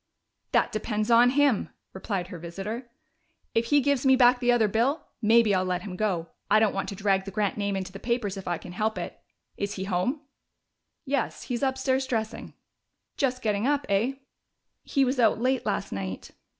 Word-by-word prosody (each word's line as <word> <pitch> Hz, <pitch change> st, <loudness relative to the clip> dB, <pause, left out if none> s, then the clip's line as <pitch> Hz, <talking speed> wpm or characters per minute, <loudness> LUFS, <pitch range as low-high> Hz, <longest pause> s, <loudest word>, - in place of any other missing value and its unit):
"That -, -, +2 dB
depends 215 Hz, +1 st, -2 dB
on 240 Hz, +1 st, +7 dB
him," 275 Hz, -4 st, +2 dB, 0.2 s
replied 190 Hz, -2 st, -3 dB
her 180 Hz, -4 st, -7 dB
visitor. 195 Hz, +9 st, -6 dB, 0.6 s
"If 230 Hz, +1 st, +2 dB
he 290 Hz, +3 st, +4 dB
gives 280 Hz, -1 st, +1 dB
me 265 Hz, -1 st, +6 dB
back 250 Hz, -1 st, +5 dB
the 245 Hz, -1 st, +3 dB
other 235 Hz, -3 st, +3 dB
bill, 245 Hz, +9 st, 0 dB, 0.2 s
maybe 225 Hz, -1 st, +5 dB
I'll 185 Hz, -1 st, +2 dB
let 180 Hz, -1 st, -2 dB
him 190 Hz, -3 st, -6 dB
go. 180 Hz, -5 st, -1 dB, 0.2 s
I 215 Hz, +1 st, +6 dB
don't 215 Hz, -2 st, +2 dB
want 195 Hz, -, -2 dB
to 200 Hz, -, -5 dB
drag 195 Hz, -1 st, +1 dB
the -, -, -5 dB
Grant 205 Hz, -1 st, -1 dB
name 200 Hz, -1 st, -1 dB
into 190 Hz, -1 st, -4 dB
the 195 Hz, -, -9 dB
papers 230 Hz, -4 st, -1 dB
if 195 Hz, -, -8 dB
I 175 Hz, -1 st, 0 dB
can 180 Hz, -, -10 dB
help 215 Hz, +4 st, -1 dB
it.... -, -, -6 dB, 0.4 s
Is 200 Hz, 0 st, -2 dB
he 190 Hz, -, -4 dB
home?" 195 Hz, -, -1 dB, 0.8 s
"Yes. 275 Hz, -1 st, -2 dB
He's 245 Hz, -2 st, -3 dB
upstairs, 265 Hz, 0 st, 0 dB
dressing." 220 Hz, -2 st, -3 dB, 0.6 s
"Just 255 Hz, -3 st, -1 dB
getting 210 Hz, +2 st, +1 dB
up, 290 Hz, -1 st, +1 dB
eh?" 210 Hz, +7 st, +2 dB, 0.7 s
"He 275 Hz, -2 st, +1 dB
was 255 Hz, +1 st, -1 dB
out 225 Hz, -2 st, +4 dB
late 255 Hz, 0 st, 0 dB
last 205 Hz, -, -2 dB
night." 95 Hz, -1 st, -5 dB
220 Hz, 190 wpm, -27 LUFS, 195-255 Hz, 0.8 s, on